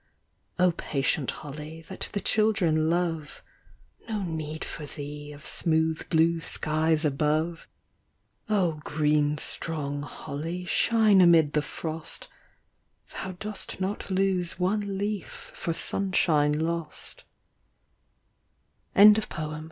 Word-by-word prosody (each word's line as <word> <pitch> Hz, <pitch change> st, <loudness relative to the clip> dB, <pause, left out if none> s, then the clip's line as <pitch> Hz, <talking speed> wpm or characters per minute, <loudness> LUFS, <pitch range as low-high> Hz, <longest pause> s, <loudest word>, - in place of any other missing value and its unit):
Oh 180 Hz, 0 st, +4 dB
patient 140 Hz, -3 st, -1 dB
holly, 155 Hz, +2 st, -7 dB
that 190 Hz, -, -4 dB
the 200 Hz, -, -2 dB
children 185 Hz, -9 st, +2 dB
love, 165 Hz, -3 st, -2 dB, 0.7 s
No 215 Hz, -3 st, -2 dB
need 155 Hz, -2 st, -4 dB
for 150 Hz, -2 st, -7 dB
thee 145 Hz, +1 st, -7 dB
of 145 Hz, 0 st, -12 dB
smooth 160 Hz, -1 st, 0 dB
blue 165 Hz, +1 st, +3 dB
skies 155 Hz, 0 st, +1 dB
above: 155 Hz, +3 st, 0 dB, 0.8 s
Oh 175 Hz, -7 st, +1 dB
green 150 Hz, 0 st, +1 dB
strong 145 Hz, -3 st, -1 dB
holly, 155 Hz, +4 st, -5 dB
shine 215 Hz, 0 st, +4 dB
amid 165 Hz, -4 st, +5 dB
the 150 Hz, -, +2 dB
frost; 160 Hz, +2 st, -5 dB, 0.8 s
Thou 190 Hz, -1 st, -5 dB
dost 210 Hz, +1 st, -6 dB
not 195 Hz, +2 st, -3 dB
lose 190 Hz, -3 st, +1 dB
one 200 Hz, +2 st, 0 dB
leaf 205 Hz, -1 st, -4 dB
for 170 Hz, -, -3 dB
sunshine 165 Hz, -5 st, +3 dB
lost 165 Hz, 0 st, -3 dB, 1.7 s
144 210 Hz, -3 st, +6 dB
MARJORY. 150 Hz, 0 st, -5 dB
165 Hz, 105 wpm, -27 LUFS, 150-185 Hz, 1.7 s, 144